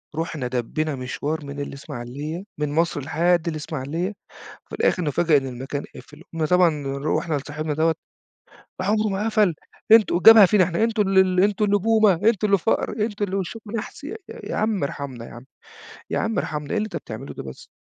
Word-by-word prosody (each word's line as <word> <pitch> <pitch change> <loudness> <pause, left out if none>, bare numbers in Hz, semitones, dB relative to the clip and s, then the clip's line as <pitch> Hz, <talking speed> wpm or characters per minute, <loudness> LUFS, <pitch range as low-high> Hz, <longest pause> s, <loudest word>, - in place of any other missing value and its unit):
رُحنا 155 -5 -3
دبّينا 135 +5 -2
مشوار 145 +4 -4
من 140 0 -7
الإسماعيلية، 140 +4 -6 0.2
من 150 -1 -1
مصر 160 -1 0
لحد 170 +5 +1
الإسماعيلية، 155 +3 -3 0.6
فالآخر 180 - +1
نُفاجأ 155 +1 +3
إن 135 -1 -2
المكان 130 +3 -5
قافل. 150 +4 -13
قُمنا 160 -1 -1
طبعًا 170 -3 +3
رُحنا 155 +2 -1
لصاحبنا 150 +2 -4
دوّة، 160 +2 +2 0.6
"ده 185 - -9
عمره 215 +1 +2
ما 195 +1 -2
قَفَل، 215 -6 +2 0.4
أنتم" 220 -6 +6
وجابها 215 +3 +9
فينا 195 0 +4
إحنا، 175 +6 0
"أنتم 225 -2 +1
ال 195 0 +3
ال 185 -1 +4
أنتم 205 +2 +2
اللي 205 0 +3
بومة، 215 -1 +4
أنتم 210 +4 +2
اللي 200 -1 +3
فقر، 225 - 0
أنتم 210 -1 -1
اللي 195 0 -3
وشكُم 205 +3 -5
نحس." 220 - -7
يا 385 +9 -5 0.3
يا - - -4
عم 215 -7 0
ارحمنا 135 -5 -6
يا - - -12
عم، 120 +2 -11 0.7
يا - - 0
عم 225 0 -1
ارحمنا، 150 -1 -4
إيه - - 0
اللي 215 - 0
أنت 215 - -8
بتعمله 115 +5 -7
ده - - -7
بس؟ 65 -1 -11
165 Hz, 185 wpm, -23 LUFS, 145-205 Hz, 0.7 s, وجابها